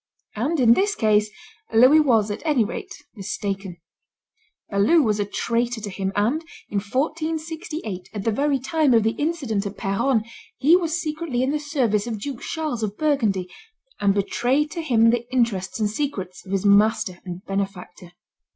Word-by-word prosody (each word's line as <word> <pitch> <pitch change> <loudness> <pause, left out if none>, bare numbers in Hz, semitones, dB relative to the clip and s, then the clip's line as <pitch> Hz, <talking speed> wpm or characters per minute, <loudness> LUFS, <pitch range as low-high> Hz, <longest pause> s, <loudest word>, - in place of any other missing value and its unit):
And 280 +9 -1
in 235 -2 +6
this 405 - +1
case 215 -1 +2 0.4
Louis 255 +7 +7
was, 225 -8 +3
at 205 - -5
any 290 -8 +2
rate, 390 - -6 0.2
mistaken; 195 -2 -4 0.9
Balue 215 +12 +4
was 215 -3 +1
a 205 - +1
traitor 235 +3 -1
to 205 -2 -6
him, 190 0 -2
and 235 +10 +1 0.3
in 205 - 0
1468, 310 - -3
at 205 -3 -5
the 225 - +1
very 280 +5 +1
time 280 0 +2
of 225 - +4
the 220 - +2
incident 265 -10 -2
at 200 - -8
Peronne, 225 +4 +1 0.3
he 310 +6 +5
was 340 -2 0
secretly 305 -6 -2
in 265 - +1
the 300 - 0
service 250 -8 0
of 225 -3 -3
Duke 260 +3 -6
Charles 310 -7 -3
of 210 -1 -3
Burgundy, 225 -12 +1 0.5
and 200 -1 +2
betrayed 250 +9 +1
to 335 - -4
him 230 -7 +4
the 240 +1 -2
interests 230 -7 0
and 215 - +2
secrets 205 -7 -4
of - - -8
his 195 0 0
master 205 -2 +3
and 180 +1 -8
benefactor. 190 -3 -5
230 Hz, 170 wpm, -23 LUFS, 200-295 Hz, 0.9 s, Louis